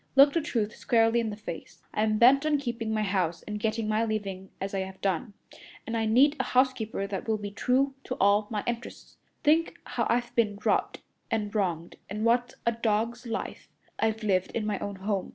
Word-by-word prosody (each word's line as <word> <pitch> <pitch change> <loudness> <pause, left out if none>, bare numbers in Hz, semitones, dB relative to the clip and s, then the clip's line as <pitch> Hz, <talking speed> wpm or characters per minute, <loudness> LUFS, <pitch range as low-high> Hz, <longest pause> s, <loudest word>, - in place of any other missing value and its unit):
Look 280 +1 +7
the 335 - +2
truth 230 -7 -2
squarely 225 0 +3
in 230 -2 -1
the 210 - -5
face. 205 -6 -9
I'm 215 0 +1
bent 260 +5 +6
on 305 -1 +2
keeping 235 -5 -3
my 215 -1 +1
house 185 -4 -1
and 210 0 -5
getting 220 +1 -1
my 215 +1 +1
living 200 -4 -3
as 195 +1 -4
I 195 - 0
have 190 0 -5
done, 195 +2 -1 0.5
and 225 - -3
I 225 -1 +1
need 270 +7 +5
a - - +2
housekeeper 250 -6 +1
that 200 +1 -5
will 220 -1 +1
be 205 -1 -6
true 265 +6 +1
to 255 - -3
all 205 +2 +3
my 210 -2 -2
interests. 240 0 -6 0.3
Think 320 +3 +3
how - - -2
I've 240 +1 0
been 210 -4 +1
robbed - - +1 0.3
and 210 -2 -1
wronged, 175 -6 -1
and 210 +3 -2
what 245 +1 +2
a 235 - +4
dog's 230 +2 -1
life 225 - -5 0.3
I've 220 0 0
lived 185 -3 +1
in 220 - -1
my 210 -2 -1
own 200 0 -4
home. 195 0 -2
220 Hz, 205 wpm, -28 LUFS, 205-240 Hz, 0.5 s, Look